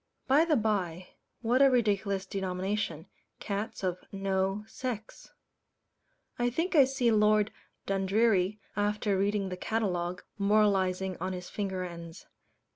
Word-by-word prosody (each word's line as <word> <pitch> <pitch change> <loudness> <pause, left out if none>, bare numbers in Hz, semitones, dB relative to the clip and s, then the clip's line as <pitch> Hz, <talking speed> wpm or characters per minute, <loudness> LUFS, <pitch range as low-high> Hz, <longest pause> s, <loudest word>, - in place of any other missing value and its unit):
By 290 +4 +5
the 320 -3 +3
bye, 185 - -1 0.3
what 245 +4 +3
a 275 - +8
ridiculous 205 -5 +1
denomination 190 -3 -2 0.3
"cats 210 +2 -4
of 180 -1 -1
no 195 +1 -1
sex"! 225 -2 -6 1.1
I 240 0 +2
think 330 +9 -1
I 280 -3 +8
see 260 -3 +1
Lord 210 -1 +4 0.3
Dundreary, 195 0 +2 0.2
after 205 0 0
reading 200 0 0
the 180 - -5
catalogue, 180 -4 -2 0.2
moralizing 195 -3 +2
on 185 +2 -3
his 180 -1 -7
finger 190 -3 -2
ends. 170 -1 -8
200 Hz, 120 wpm, -30 LUFS, 185-220 Hz, 1.1 s, a